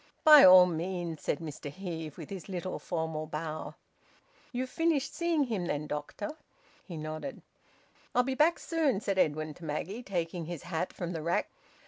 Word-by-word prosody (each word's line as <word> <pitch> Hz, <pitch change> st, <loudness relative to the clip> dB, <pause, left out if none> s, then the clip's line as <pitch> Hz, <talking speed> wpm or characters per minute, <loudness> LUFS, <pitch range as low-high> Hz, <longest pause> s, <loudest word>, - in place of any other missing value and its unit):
"By 305 Hz, -2 st, +10 dB
all 185 Hz, -1 st, +10 dB
means," 175 Hz, -1 st, -3 dB
said -, -, 0 dB
Mr 150 Hz, -2 st, -7 dB
Heve, 160 Hz, -2 st, -6 dB
with 160 Hz, -1 st, -9 dB
his 195 Hz, 0 st, -7 dB
little 185 Hz, -1 st, -4 dB
formal 160 Hz, -2 st, -3 dB
bow. 155 Hz, 0 st, -5 dB, 0.8 s
"You've 255 Hz, +1 st, -3 dB
finished 325 Hz, -4 st, +1 dB
seeing 340 Hz, -3 st, +1 dB
him 215 Hz, -9 st, -2 dB
then, 150 Hz, -1 st, -2 dB
doctor?" 150 Hz, +7 st, -4 dB, 0.5 s
He 170 Hz, -4 st, -8 dB
nodded. 155 Hz, -, -6 dB, 0.7 s
"I'll 250 Hz, -, +5 dB
be 265 Hz, +1 st, -1 dB
back 305 Hz, +5 st, +4 dB
soon," 310 Hz, -, 0 dB
said 195 Hz, -2 st, -1 dB
Edwin 155 Hz, -1 st, +1 dB
to 170 Hz, -, -15 dB
Maggie, 165 Hz, +9 st, -3 dB
taking 175 Hz, -5 st, -3 dB
his 170 Hz, -2 st, -6 dB
hat 175 Hz, 0 st, -2 dB
from 175 Hz, 0 st, -5 dB
the 160 Hz, -, -3 dB
rack. 170 Hz, +2 st, 0 dB
175 Hz, 165 wpm, -30 LUFS, 155-220 Hz, 0.8 s, By